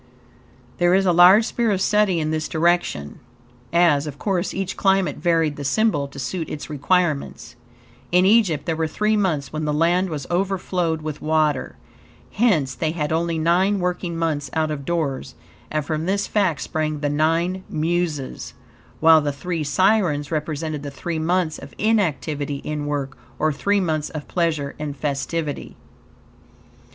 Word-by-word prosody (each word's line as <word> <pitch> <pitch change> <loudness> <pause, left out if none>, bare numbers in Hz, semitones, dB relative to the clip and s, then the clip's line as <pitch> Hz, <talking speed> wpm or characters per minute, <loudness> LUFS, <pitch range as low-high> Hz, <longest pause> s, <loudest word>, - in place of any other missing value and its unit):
There 175 +1 +4
is 195 0 +2
a 180 - +4
large 180 +6 +7
sphere 235 -1 0
of 195 -3 +1
study 200 -3 +2
in 155 0 -1
this 155 0 -1
direction, 165 - 0 0.5
as, 160 -4 +3
of 145 -1 -7
course, 190 0 -1
each 190 -1 -3
climate 195 -2 +2
varied 165 -4 +1
the 145 - -5
symbol 145 -1 +1
to 140 - -14
suit 150 +6 -4
its 155 +1 -6
requirements. 155 0 -1 0.6
In 180 +1 +4
Egypt 195 -7 +3
there 165 - -1
were 160 0 -1
three 210 +7 0
months 155 -10 -1
when 155 0 -2
the 150 - 0
land 175 +4 +2
was 145 -4 -4
overflowed 180 -3 -1
with 155 -1 -5
water; 155 -3 0 0.6
hence, 175 - +2
they 155 +2 -2
had 150 -3 -2
only 165 +1 0
nine 180 +5 +2
working 180 -1 -2
months 155 -4 -1
out 155 -1 0
of 140 -2 -5
doors, 140 -6 -2 0.3
and 155 -1 -2
from 155 +2 -2
this 200 +1 0
fact 190 -9 0
sprang 155 -1 -2
the 145 - 0
Nine 165 +5 0
Muses, 160 -3 -2 0.5
while 160 0 +7
the 145 -1 -1
Three 165 +3 -3
Sirens 170 -2 +2
represented 155 -1 -3
the 145 - -5
three 160 +4 -4
months 170 0 0
of - - -12
inactivity 155 -9 0
in 150 -1 -3
work, 140 -2 -3 0.2
or 155 +2 +1
three 200 +8 +1
months 155 -5 -1
of 155 -2 -7
pleasure 160 -5 -1
and 145 -2 -5
festivity. 150 +1 -3
160 Hz, 160 wpm, -22 LUFS, 150-180 Hz, 0.6 s, large